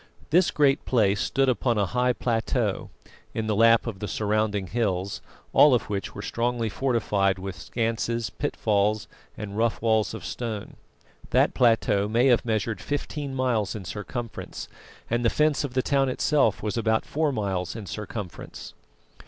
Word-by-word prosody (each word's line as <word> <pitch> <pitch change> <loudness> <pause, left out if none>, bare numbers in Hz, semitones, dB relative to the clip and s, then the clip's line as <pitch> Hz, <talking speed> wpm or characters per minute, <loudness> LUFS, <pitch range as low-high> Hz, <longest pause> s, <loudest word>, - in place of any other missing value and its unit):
This 175 +3 +5
Great 140 -2 +2
Place 105 -5 +2
stood 135 0 +1
upon 120 -2 +1
a 100 - +2
high 125 +4 +1
plateau, 115 -2 -1 0.5
in 110 - -1
the 110 -1 0
lap 115 +1 +5
of 110 -5 -5
the 105 - -4
surrounding 105 -2 0
hills, 100 -3 -1 0.3
all 145 -3 +7
of 110 -2 -2
which 100 -2 -3
were - - -6
strongly 120 -1 -1
fortified 105 -6 +1
with 95 0 -6
schanses, 115 +5 -2
pitfalls, 105 -6 0 0.3
and 105 -2 -6
rough 115 +1 +1
walls 110 -1 +1
of - - -8
stone. 110 -4 -5 0.5
That - - +3
plateau 115 -4 +3
may 115 +4 +2
have 120 - +4
measured 110 -2 -1
fifteen 145 -1 -4
miles 120 -6 0
in 100 -3 -6
circumference, 115 +5 -6 0.4
and 120 +1 0
the 115 - +4
fence 150 +1 +2
of 130 -3 -5
the 130 - +2
town 135 -2 +2
itself 130 -4 +2
was 105 +1 -2
about 110 0 +1
four 155 0 0
miles 95 -6 -2
in 110 -3 -6
circumference. 105 -1 -7
115 Hz, 160 wpm, -26 LUFS, 105-125 Hz, 0.5 s, all